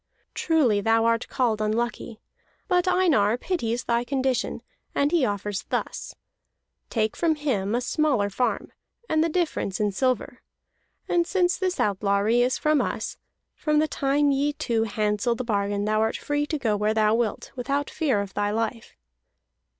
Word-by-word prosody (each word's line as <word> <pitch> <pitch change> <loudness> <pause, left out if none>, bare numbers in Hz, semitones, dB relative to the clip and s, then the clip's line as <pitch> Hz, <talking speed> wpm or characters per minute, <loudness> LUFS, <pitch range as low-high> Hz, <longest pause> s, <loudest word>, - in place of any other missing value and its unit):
Truly 270 -11 +2
thou 225 +2 +3
art 230 0 +1
called 230 -5 0
unlucky. 225 +1 -2 0.5
But 360 -2 +2
Einar 285 - +3
pities 240 -7 -2
thy 235 0 +1
condition, 260 -1 -1 0.3
and 285 +1 +2
he 325 -7 +3
offers 205 0 -3
thus: - - -3 0.7
Take 220 -2 0
from 330 -2 +1
him 235 -9 -1
a 245 - 0
smaller 255 -5 +1
farm, 245 +5 -1 0.3
and 315 0 +2
the 335 - +1
difference 315 - -1
in 210 -1 +1
silver. 250 +2 -1 0.7
And 345 -1 +2
since 360 -2 +2
this 370 -1 -2
outlawry 205 +3 +2
is 250 +1 +2
from 305 -1 +2
us, - - -3 0.4
from 305 -1 0
the 310 +1 +3
time 285 0 +1
ye 285 +2 +1
two 230 -5 0
handsel 210 +2 0
the 255 - -4
bargain 205 -2 -1
thou 215 0 +1
art 220 0 0
free 290 0 -1
to 310 - -1
go 225 -7 0
where 210 +1 0
thou 215 -1 +3
wilt, 230 -2 -1
without 275 +3 -2
fear 265 -10 +1
of 200 -1 -7
thy 205 0 0
life." 225 +1 -3
240 Hz, 160 wpm, -25 LUFS, 215-295 Hz, 0.7 s, thou